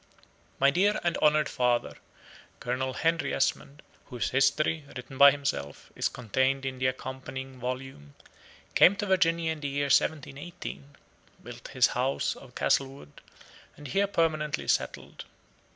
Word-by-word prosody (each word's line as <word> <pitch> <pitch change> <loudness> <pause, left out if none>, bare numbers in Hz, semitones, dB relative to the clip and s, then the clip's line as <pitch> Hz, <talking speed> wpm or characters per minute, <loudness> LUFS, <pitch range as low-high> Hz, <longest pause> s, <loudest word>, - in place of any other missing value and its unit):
My 140 +1 +5
dear 200 +7 +2
and 170 -1 +1
honored 150 0 +3
father, 125 -2 0 0.6
Colonel 130 +1 -2
Henry 165 +4 0
Esmond, 140 +2 -1 0.2
whose 125 -3 -3
history, 155 +3 +2
written 130 +1 -9
by 140 0 +10
himself, 135 - -4
is - - 0
contained 130 +4 -1
in 130 -1 -4
the 130 - +2
accompanying 130 0 -6
volume, 125 - -6 0.6
came 190 - +6
to 205 - -3
Virginia 170 -4 +2
in 160 - -5
the 145 - -4
year 140 +1 -1
1718, 145 -1 -2 0.5
built - - -10
his - - +3
house 130 +2 -1
of 130 -2 -15
Castlewood, 135 - -1 0.6
and 145 -2 -9
here 200 +8 +1
permanently 155 -5 -1
settled. - - -2
140 Hz, 135 wpm, -28 LUFS, 130-155 Hz, 0.6 s, by